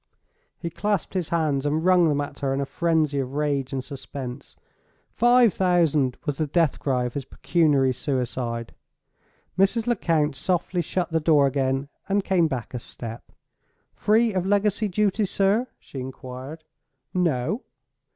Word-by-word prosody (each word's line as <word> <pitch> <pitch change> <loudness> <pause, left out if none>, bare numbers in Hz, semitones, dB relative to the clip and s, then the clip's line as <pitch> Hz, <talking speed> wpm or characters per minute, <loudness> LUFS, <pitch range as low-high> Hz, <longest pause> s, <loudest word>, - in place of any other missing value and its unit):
He 170 - -5
clasped 205 +1 -1
his 180 -4 -2
hands, 155 -5 +1
and 155 +3 0
wrung 180 -2 +5
them 145 -1 +1
at 145 -1 -6
her 135 -1 0
in - - -1
a 140 - 0
frenzy 155 -2 +1
of 135 0 -4
rage 145 -3 0
and 130 -1 -2
suspense. 135 -2 -8 0.6
"Five 240 -3 +5
thousand" 165 -8 +2
was 145 -2 -2
the 155 - +1
death 160 0 +1
cry 130 -3 0
of 120 - -4
his 140 - -3
pecuniary 145 -5 +2
suicide. 125 -3 -3 0.9
Mrs. 220 +4 +3
Lecount 165 - +1
softly 180 +3 0
shut 175 +2 -2
the 160 - +2
door 150 -3 +4
again, 135 0 0 0.2
and 200 0 +2
came 175 -4 +3
back 130 -6 -5
a 125 - -3
step. 115 0 -9 0.6
"Free 220 +1 +2
of 185 -2 0
legacy 205 +1 +2
duty, 205 +2 +1
sir?" 200 +5 +1
she 135 - -9
inquired. 130 +4 -8 0.5
"No." 175 - 0
155 Hz, 150 wpm, -25 LUFS, 135-185 Hz, 0.9 s, wrung